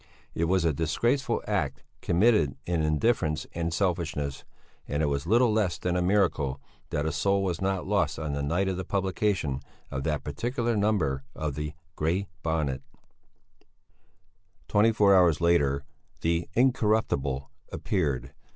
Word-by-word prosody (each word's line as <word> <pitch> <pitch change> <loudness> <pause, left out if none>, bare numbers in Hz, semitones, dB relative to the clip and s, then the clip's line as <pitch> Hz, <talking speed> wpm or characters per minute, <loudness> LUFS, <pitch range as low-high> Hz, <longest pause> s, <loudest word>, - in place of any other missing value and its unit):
It 85 - 0
was 90 0 +2
a 80 - +3
disgraceful 115 - 0
act, - - -1 0.2
committed 90 - +3
in 85 -2 0
indifference 75 0 +1
and 85 0 -2
selfishness; 80 -6 -1 0.4
and 75 +2 -1
it - - +3
was 70 +1 -1
little 115 +2 +4
less 100 -6 +1
than 90 -1 -1
a 90 - +1
miracle 90 -8 +1 0.3
that 75 - -1
a 80 - 0
soul 100 +4 +1
was 90 -3 -2
not 95 -1 0
lost - - +1
on 75 -2 -3
the 70 - -2
night 85 +7 0
of 95 -1 -1
the 95 - -3
publication 95 -7 0 0.3
of 65 0 -3
that 75 -2 -1
particular 120 - -1
number 95 -11 +1
of 75 -2 -3
the 75 +1 -4 0.2
Grey 85 +6 0 0.2
Bonnet. 75 -5 -1 1.9
Twenty 110 +2 +4
four 100 -3 +5
hours 85 -4 +5
later 70 -6 +2 0.4
the 85 +1 0
Incorruptible 105 - +1 0.2
appeared. 75 -10 -1
85 Hz, 145 wpm, -27 LUFS, 75-100 Hz, 1.9 s, four